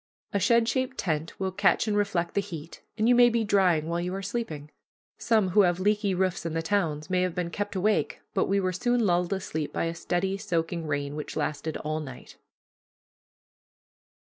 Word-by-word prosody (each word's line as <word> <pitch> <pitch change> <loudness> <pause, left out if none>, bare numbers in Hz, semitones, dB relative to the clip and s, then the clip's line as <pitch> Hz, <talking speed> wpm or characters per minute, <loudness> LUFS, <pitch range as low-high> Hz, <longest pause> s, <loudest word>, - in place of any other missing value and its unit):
A 200 - +2
shed 230 +4 +3
shaped 260 +2 -1
tent 160 -2 -2
will 190 -1 -1
catch 200 +3 +2
and 210 - +1
reflect 195 -5 0
the 200 - +2
heat, 170 -5 -9 0.2
and 220 0 +2
you 245 - +6
may 245 0 +7
be 230 -1 +1
drying 180 -7 +3
while 170 +1 -1
you 180 +2 -3
are 195 - -4
sleeping. 165 -9 -4 0.5
Some 220 -5 +2
who 205 +4 +5
have 175 -2 +2
leaky 205 0 +1
roofs 185 -1 0
in 165 -1 -3
the 165 - -1
towns 165 -3 -1
may 180 -1 +2
have 180 -2 -1
been 175 -2 -2
kept 205 +3 -3
awake, 205 +3 +1
but 190 - +2
we 200 +1 +2
were 185 -1 0
soon 240 +5 +1
lulled 175 -1 +1
asleep 160 -6 -3
by - - -1
a 165 - -2
steady, 180 +3 -1
soaking 170 -4 -2
rain, 145 -1 -2
which 150 - -6
lasted 155 +1 -2
all 155 +1 -3
night. 135 -5 -10
185 Hz, 195 wpm, -27 LUFS, 165-205 Hz, 0.5 s, may